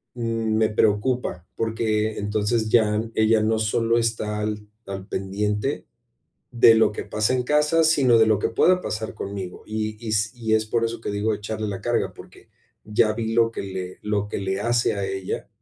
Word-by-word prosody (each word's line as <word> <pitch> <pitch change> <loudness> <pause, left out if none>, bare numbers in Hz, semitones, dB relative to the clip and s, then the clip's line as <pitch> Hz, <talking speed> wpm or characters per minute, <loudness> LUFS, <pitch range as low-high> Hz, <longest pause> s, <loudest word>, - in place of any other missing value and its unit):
mm, 115 -2 -1
me 110 0 +3
preocupa, 105 -3 0
porque 110 -1 -1
entonces 105 +2 0
ya 110 -1 +3
ella 110 0 +3
no 110 +1 +1
solo 115 +2 +1
está 110 -2 -1
al 105 0 -3 0.2
al 95 -1 -6
pendiente 105 +7 -2 0.7
de 115 -2 +6
lo 110 -1 +3
que - - -5
pasa 105 +3 0
en 130 -1 +1
casa, 150 +4 +2
sino 135 -7 +4
de 110 - +5
lo 110 -2 +3
que - - -1
pueda 180 +10 +3
pasar 110 0 -4
conmigo, 95 -2 -6
y 110 0 -3
y - - -2
s 105 0 +1
y 115 -3 -3
es 110 0 +1
por 115 +1 0
eso 115 0 -3
que - - -4
digo 105 +2 0
de - - -3
echarle 110 +1 -4
la 100 -2 -4
carga, 120 +3 -1
porque - - -15 0.4
ya 110 0 +2
vi 110 0 -3
lo 115 -1 +4
que - - -5
le 95 -1 -6
lo 105 -1 -1
que - - -3
le 95 0 -2
hace 120 +2 +1
a 100 -1 -3
ella 95 -1 -4
110 Hz, 195 wpm, -23 LUFS, 105-115 Hz, 0.7 s, de